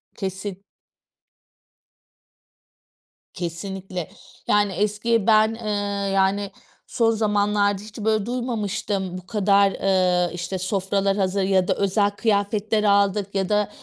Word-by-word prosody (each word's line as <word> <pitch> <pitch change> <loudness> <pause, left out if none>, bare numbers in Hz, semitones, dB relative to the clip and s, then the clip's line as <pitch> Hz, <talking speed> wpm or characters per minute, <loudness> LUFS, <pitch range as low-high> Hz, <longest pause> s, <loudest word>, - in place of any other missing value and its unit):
Kesin. 190 0 -5 2.7
Kesinlikle! 180 +1 -5 0.4
Yani 205 -1 +2
eski 210 +3 0
ben, 215 -1 +5
ııı, 205 -3 -2
yani 195 +1 +1 0.4
son 230 -2 +2
zamanlarda 205 -2 +1
hiç 215 -1 -12
böyle 215 -1 +1
duymamıştım, 210 -6 -3
bu 185 - -12
kadar, 200 -2 +3
ııı, 180 -3 +1
işte 175 +2 -4
sofralar 195 +1 0
hazır 195 0 0
ya 190 -1 +2
da - - +3
özel 200 +1 +1
kıyafetler 210 0 0
aldık 200 -1 +2
ya 190 -1 0
da 210 -1 +1
200 Hz, 110 wpm, -23 LUFS, 190-210 Hz, 2.7 s, ben